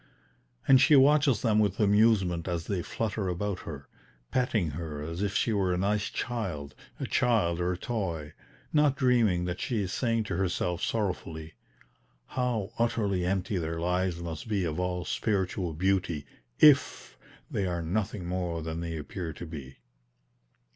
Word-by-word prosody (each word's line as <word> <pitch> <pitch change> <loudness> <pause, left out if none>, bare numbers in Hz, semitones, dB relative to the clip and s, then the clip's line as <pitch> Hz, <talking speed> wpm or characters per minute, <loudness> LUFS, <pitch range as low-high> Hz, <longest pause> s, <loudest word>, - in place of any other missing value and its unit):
And 130 -1 +7
she 155 - +6
watches 140 -2 +5
them 110 -3 +3
with 100 -2 +1
amusement 100 -5 +3
as 85 -2 -2
they 95 -4 -1
flutter 110 0 -2
about 90 +1 -2
her, 70 -4 -8 0.4
petting 110 - +1
her 75 -1 -5
as 85 +4 -5
if 100 -1 -1
she 115 - +2
were 95 -3 +1
a 90 - +1
nice 100 +2 0
child, 90 -12 -4 0.3
a - - -2
child 90 -8 +2
or 90 +1 +1
a - - -5
toy, 85 -10 -3 0.4
not 150 -3 +4
dreaming 120 - +3
that 90 0 -3
she 115 -5 -1
is 95 - -4
saying 115 -3 +1
to 95 -4 -3
herself 90 -2 -1
sorrowfully: 85 -7 -3 0.7
"How 120 -5 -2
utterly 100 -6 +1
empty 95 +1 0
their 80 0 -3
lives 90 0 0
must 80 +3 -6
be 105 -4 0
of 80 -1 -2
all 90 -1 -2
spiritual 95 -5 -1
beauty 90 -3 0 0.3
IF 145 -2 +4 0.4
they 95 - 0
are 85 -1 -2
nothing 95 +2 -2
more 85 -2 -2
than 80 +1 -4
they 85 -1 -4
appear 80 +3 -5
to 85 - -8
be." 70 -5 -9
95 Hz, 160 wpm, -29 LUFS, 85-110 Hz, 0.7 s, And